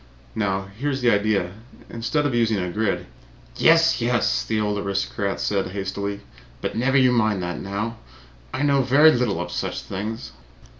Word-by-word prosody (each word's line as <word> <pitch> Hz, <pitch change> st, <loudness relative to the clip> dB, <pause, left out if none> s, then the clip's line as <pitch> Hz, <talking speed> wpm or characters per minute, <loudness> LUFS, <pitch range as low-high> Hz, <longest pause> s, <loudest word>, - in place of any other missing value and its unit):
Now, 95 Hz, -3 st, -1 dB
here 105 Hz, +9 st, -4 dB
is 135 Hz, -1 st, -2 dB
the 120 Hz, -, +5 dB
idea: 100 Hz, -4 st, +1 dB, 0.4 s
instead 120 Hz, +6 st, -1 dB
of 145 Hz, -, 0 dB
using 115 Hz, -2 st, +2 dB
a 90 Hz, -2 st, -2 dB
grid 105 Hz, +1 st, -1 dB, 0.3 s
" -, -, -26 dB
"Yes, 165 Hz, -, +4 dB
yes!" 115 Hz, -, +1 dB
the 110 Hz, -, -1 dB
old 105 Hz, -1 st, 0 dB
aristocrat 100 Hz, 0 st, -2 dB
said 100 Hz, -2 st, 0 dB
hastily. 100 Hz, +1 st, -4 dB, 0.4 s
"But -, -, -4 dB
never 130 Hz, +4 st, +2 dB
mind 115 Hz, -7 st, +3 dB
that 90 Hz, 0 st, -3 dB
now. 105 Hz, +4 st, -3 dB, 0.5 s
I 145 Hz, -, -2 dB
know 140 Hz, -1 st, +3 dB
very 140 Hz, +5 st, +6 dB
little 120 Hz, -, 0 dB
of 85 Hz, 0 st, -4 dB
such -, -, -3 dB
things. 105 Hz, +4 st, -5 dB
105 Hz, 165 wpm, -23 LUFS, 100-125 Hz, 0.5 s, very